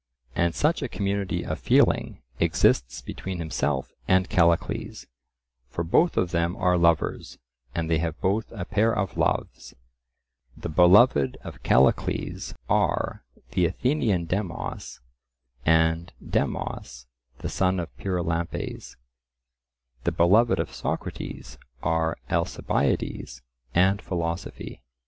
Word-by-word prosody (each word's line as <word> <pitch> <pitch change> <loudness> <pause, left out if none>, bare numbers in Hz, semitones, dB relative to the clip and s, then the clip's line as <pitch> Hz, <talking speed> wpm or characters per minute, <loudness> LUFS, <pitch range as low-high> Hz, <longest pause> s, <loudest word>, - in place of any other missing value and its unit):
And 85 -1 +1
such 155 +3 +1
a 135 - -3
community 100 -2 -2
of - - -3
feeling - - +2 0.2
exists 65 -6 +2
between 95 -1 -5
himself 75 -5 -2 0.2
and 95 0 +3
Callicles, 85 -1 +1 0.6
for 85 - -3
both 160 - +2
of 90 -2 +1
them 85 +1 0
are 90 -1 +2
lovers, 85 -2 +1 0.4
and 85 -1 -1
they 80 -1 +2
have 80 -1 -3
both 105 +4 0
a 100 -6 -5
pair 110 +4 +2
of 95 -4 -2
loves; - - -1 0.8
the - - -5
beloved 90 - +5
of - - -9
Callicles 65 +2 +1
are - - 0 0.3
the 90 -2 +2
Athenian 105 - 0
Demos 90 -7 -4 0.7
and 80 +1 +3
Demos 60 0 -3 0.3
the - - -5
son 95 0 +1
of 85 - -6
Pyrilampes; 85 -3 -3 1.1
the - - +1
beloved 95 +3 +4
of 85 - -3
Socrates 60 0 -5 0.2
are 80 0 +1
Alcibiades - - -1 0.3
and 95 +4 +4
philosophy. 85 -6 -4
85 Hz, 110 wpm, -26 LUFS, 80-95 Hz, 1.1 s, beloved